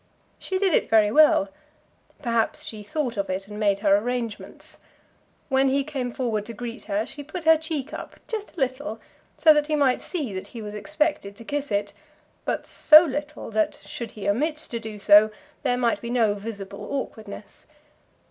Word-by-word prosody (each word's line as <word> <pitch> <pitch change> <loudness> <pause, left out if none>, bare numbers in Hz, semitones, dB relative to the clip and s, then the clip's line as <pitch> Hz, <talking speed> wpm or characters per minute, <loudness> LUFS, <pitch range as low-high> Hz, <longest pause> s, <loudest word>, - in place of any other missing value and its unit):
She 380 - -2
did 380 -3 +2
it - - +2
very 215 -2 +5
well. 295 -8 +5 0.7
Perhaps 230 -3 0
she 220 - -7
had 205 - -14
thought 250 -4 -2
of 200 -1 -2
it, 190 +1 -3
and 210 0 -8
made 200 -2 +2
her 200 -2 +5
arrangements. 230 0 -4 0.7
When 270 -1 +3
he 275 +1 +1
came 265 -4 -4
forward 220 -4 -2
to 230 - -7
greet 235 +1 -7
her, 205 +1 -1
she 290 - -8
put 310 +4 -7
her 320 0 +7
cheek 310 -3 -4
up, - - -8
just 435 -4 -5
a - - -5
little, 260 -2 -2 0.4
so 315 -2 +7
that 300 -1 +1
he 310 - +1
might 275 -4 +2
see 290 - -4
that 185 - -5
he 230 - -9
was 210 0 -7
expected 300 -3 -1
to 230 - -12
kiss 290 +2 -3
it; 205 0 -1 0.5
but - - -2
so 310 +2 +7
little, 295 -2 -5
that 215 0 +1
should 230 +2 -7
he 205 -2 -6
omit 295 +10 +1 0.2
to 235 - -2
do 220 -2 -7
so, 205 +1 +7 0.3
there 250 -3 +1
might 235 -4 +1
be 235 - -5
no 230 -4 +2
visible 200 -1 -7
awkwardness. 220 -7 -7
235 Hz, 190 wpm, -25 LUFS, 210-290 Hz, 0.7 s, her